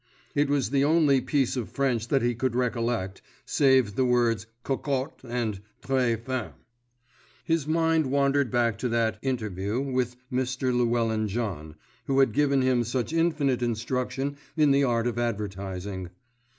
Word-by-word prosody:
It 145 0 +2
was 140 -5 +1
the 140 -1 +3
only 145 -3 +4
piece 135 -3 0
of 125 -4 -3
French 125 -5 0
that 135 -1 +1
he 120 0 +2
could 120 +1 -1
recollect, 115 -6 -1 0.2
save 130 -6 +3
the 130 - +1
words 120 -3 +2 0.2
"cocotte" 135 +1 -2
and 115 -5 -3 0.2
"très 125 -4 +1
femme." 130 -1 -4 0.9
His 165 -3 0
mind 160 -1 +2
wandered 140 0 +2
back 115 -3 +1
to 125 - -1
that 115 -1 0
"interview" 110 -4 -2
with 130 -3 -1 0.2
Mr. 130 0 0
Llewellyn 115 -3 +1
John, 95 -9 -4 0.3
who 135 0 +1
had 135 -4 +4
given 140 0 +2
him 125 -2 +2
such 120 +3 -2
infinite 150 -6 +1
instruction 125 +4 -2 0.2
in 150 -2 +5
the 140 +1 +4
art 120 -3 +1
of 120 -1 -1
advertising. 100 -4 -4
125 Hz, 150 wpm, -27 LUFS, 115-135 Hz, 0.9 s, in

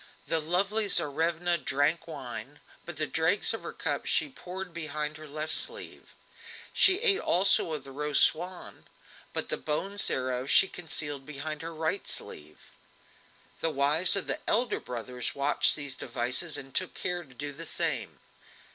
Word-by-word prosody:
The 165 - +4
lovely 195 +7 +1
Tsarevna 170 +4 +1
drank 145 +5 0
wine, 140 -2 -7 0.3
but 175 -3 -6
the 155 - +1
dregs 160 +9 +2
of 225 - -4
her - - -6
cup - - -3
she - - +2
poured 190 -7 -8
behind 150 -2 -3
her 155 0 -10
left 155 +2 -1
sleeve; 475 0 -2 0.6
she 380 -1 +6
ate 415 -5 +5
also 180 -2 +3
of 150 -3 -4
the 135 - -11
roast 150 +1 +2
swan, 180 +3 -2 0.4
but - - -2
the - - +1
bones 195 +7 -1
thereof 130 0 -1
she 190 - +6
concealed 150 -6 -2
behind 150 +2 -6
her 165 +1 -5
right 160 +4 -2
sleeve. 75 +1 -5 0.9
The 165 - +1
wives 150 +5 +4
of 200 - +2
the - - 0
elder 240 0 +1
brothers 125 0 -5
watched 140 +1 +3
these 145 -3 -3
devices, 130 +6 0
and 135 -1 -8
took 185 - -1
care 175 0 -2
to 135 -5 -18
do 145 +2 -5
the 165 +3 -6
same. - - -1
155 Hz, 160 wpm, -29 LUFS, 140-175 Hz, 0.9 s, she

